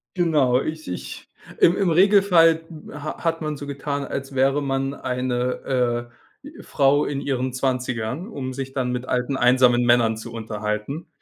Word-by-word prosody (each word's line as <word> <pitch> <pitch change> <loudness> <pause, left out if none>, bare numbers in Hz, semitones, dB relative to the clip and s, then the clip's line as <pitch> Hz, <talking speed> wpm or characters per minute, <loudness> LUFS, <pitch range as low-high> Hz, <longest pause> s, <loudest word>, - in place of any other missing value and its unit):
Genau, 150 -8 +2
ich 155 +1 -5
ich 90 - -7 0.3
im 170 - +5
im 195 -3 +2
Regelfall 175 -3 +4 0.3
ha 145 +1 -7
hat 165 -1 0
man 155 -1 -3
so 145 - -8
getan, 140 0 -4
als 135 0 -6
wäre 135 +2 +2
man 135 0 -1
eine, 125 -1 -2 0.3
äh, 290 +2 -11
Frau 140 +1 +2
in 140 -1 -3
ihren 130 -2 -2
20ern, 125 - -2
um 135 - -5
sich 135 0 -6
dann 130 -2 -1
mit 125 0 -3
alten, 125 +2 -1
einsamen 125 -1 +4
Männern 120 -2 +3
zu 115 +1 -9
unterhalten. 110 +6 -4
135 Hz, 155 wpm, -23 LUFS, 125-150 Hz, 0.3 s, im